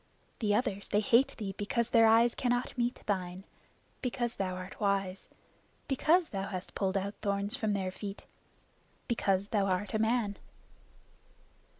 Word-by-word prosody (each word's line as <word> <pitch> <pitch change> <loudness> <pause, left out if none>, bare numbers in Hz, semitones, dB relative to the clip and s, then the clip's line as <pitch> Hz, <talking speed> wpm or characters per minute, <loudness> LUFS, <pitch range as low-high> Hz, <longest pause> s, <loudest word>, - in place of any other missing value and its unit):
The 210 -3 +2
others 205 -4 -1
they 205 - +2
hate 245 +6 +3
thee 200 -3 -4
because 235 +3 0
their 225 -1 +6
eyes 230 +2 +5
cannot 245 0 -1
meet 240 0 -1
thine; 185 -2 -2 0.6
because 240 -2 -2
thou 185 -2 -1
art 185 +1 -8
wise; 195 -2 -1 0.6
because 320 +5 +3
thou 195 -1 -3
hast 185 -2 -6
pulled 195 -1 0
out 200 +1 -2
thorns 200 +2 -1
from 220 -6 0
their 190 -2 -1
feet 200 +1 -7 0.8
because 200 -4 +1
thou 200 -3 +1
art 190 +1 -1
a 215 - +1
man." 220 -2 +1
205 Hz, 150 wpm, -31 LUFS, 195-235 Hz, 0.8 s, their